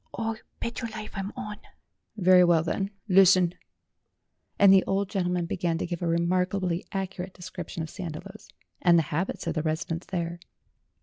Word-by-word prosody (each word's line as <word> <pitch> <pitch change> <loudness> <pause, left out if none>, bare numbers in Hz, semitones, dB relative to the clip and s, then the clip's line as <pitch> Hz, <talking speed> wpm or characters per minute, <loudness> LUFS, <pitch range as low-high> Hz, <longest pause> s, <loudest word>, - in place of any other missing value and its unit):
"O 225 -1 -1 0.2
bet 235 - -4
your 230 - -3
life, 215 -1 -7
I'm 195 0 -4
on!" 210 0 -6 0.6
"Very 185 -2 +6
well, 170 -2 +4
then; 195 +4 -1 0.2
listen." 185 -2 +6 1.0
And 200 -1 +7
the 190 - +6
old 195 0 0
gentleman 180 -3 0
began 170 -1 -1
to - - -2
give 175 0 -4
a 175 - -1
remarkably 180 +1 0
accurate 190 -1 -4
description 180 -2 -6
of 160 - -6
Sandiloes, 185 +4 -8 0.3
and 175 -2 +6
the 165 - +4
habits 180 +6 -2
of 165 - -1
the 155 - -1
residents 160 +2 -3
there. 170 -2 -3
180 Hz, 165 wpm, -27 LUFS, 170-195 Hz, 1.0 s, And